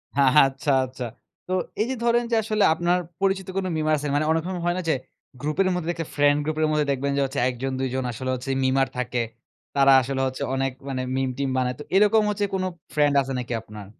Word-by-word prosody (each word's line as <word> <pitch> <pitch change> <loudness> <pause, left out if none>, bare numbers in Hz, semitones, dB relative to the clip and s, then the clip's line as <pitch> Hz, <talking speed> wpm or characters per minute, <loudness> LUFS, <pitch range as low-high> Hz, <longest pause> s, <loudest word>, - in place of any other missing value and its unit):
আচ্ছা, 135 +1 +4
আচ্ছা। 130 0 -7 0.4
তো - - -6 0.3
এই - - +2
যে 265 - -1
ধরেন 235 0 +3
যে - - +3
আসলে 215 -1 +1
আপনার 175 +2 +1 0.2
পরিচিত 195 -1 +1
কোনো 190 - 0
মিমার 155 0 +1
আছে? 145 +1 -4
মানে 150 +1 +2
অনেক 160 0 +1
সময় 180 -2 -4
হয় 175 0 +1
না 185 - -1
যে - - +4 0.5
গ্রুপের 155 +6 +1
মধ্যে 180 -2 -2
যদি 175 - +1
একটা 165 -2 -4
ফ্রেন্ড 145 0 +4
গ্রুপের 155 0 0
মধ্যে 150 -1 +2
দেখবেন 140 +1 -1
যে 140 - +2
হচ্ছে 135 +1 -3
১ 125 - -5
জন, 135 - 0
২ 130 0 -1
জন 130 - -1
আসলে 130 +3 -5
হচ্ছে 125 +2 -7
মিমার 135 +1 +2
থাকে। 125 -1 -1 0.5
তারা 140 -1 +6
আসলে 135 +1 -2
হচ্ছে 130 0 -4
অনেক 135 0 0 0.2
মানে 130 -1 -2 0.2
মিম-টিম 135 +1 -1
বানায়। 125 -1 0
তো 150 - -6
এইরকম 210 +2 +5
হচ্ছে 205 0 0
কোনো 185 0 -1 0.3
ফ্রেন্ড 145 -1 +3
আছে 135 0 -4
নাকি 125 0 -4
আপনার? 105 -2 -10
145 Hz, 225 wpm, -24 LUFS, 130-175 Hz, 0.5 s, তারা